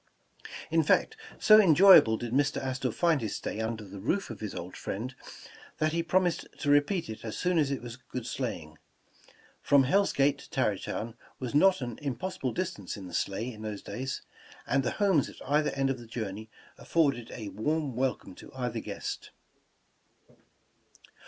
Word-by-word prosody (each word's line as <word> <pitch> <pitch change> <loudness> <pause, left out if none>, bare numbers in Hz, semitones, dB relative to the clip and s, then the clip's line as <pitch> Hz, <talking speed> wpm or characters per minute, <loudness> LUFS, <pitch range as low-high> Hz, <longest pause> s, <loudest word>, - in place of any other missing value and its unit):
In - - +4
fact, 445 - +2 0.2
so 215 0 +8
enjoyable 180 - +7
did 120 0 -5
Mr. 145 +2 +2
Astor 130 -1 -2
find 165 +1 +2
his 110 -3 -3
stay - - -4
under 110 -1 -3
the 100 0 -9
roof 155 - -1
of 110 - -8
his 105 -2 -5
old 90 +1 -6
friend, 120 +6 -5 0.6
that 155 0 +1
he 170 +1 0
promised 175 0 +1
to 145 - +2
repeat 145 +5 +2
it 110 0 -8
as 110 -2 -5
soon 180 -2 +1
as 145 -3 +2
it 140 -3 -3
was 120 0 -7
good 125 -2 -7
sleighing. 95 - -5 0.8
From 140 -1 +5
Hell 195 +10 +3
Gate 140 +1 +2
to - - -13
Tarrytown 115 +1 -2 0.3
was 125 -3 -4
not 185 +3 +5
an 120 -3 -5
impossible 140 0 -3
distance 180 - -4
in 95 -2 -8
a - - -13
sleigh 110 +8 -2
for 105 - -11
those 105 -2 -5
days, 130 +2 -5 0.4
and 135 - +2
the 125 - -1
homes 195 -9 +3
at - - -12
either 150 +2 +2
end 135 0 +1
of 130 - -4
the 120 - -11
journey 110 -2 -5 0.3
af - - -13
forded 140 -8 +1
a 110 -3 -6
warm 140 +7 -1
welcome 130 -6 -2
to - - -13
either 125 -3 -2
guest. - - -6
130 Hz, 180 wpm, -29 LUFS, 110-155 Hz, 0.8 s, so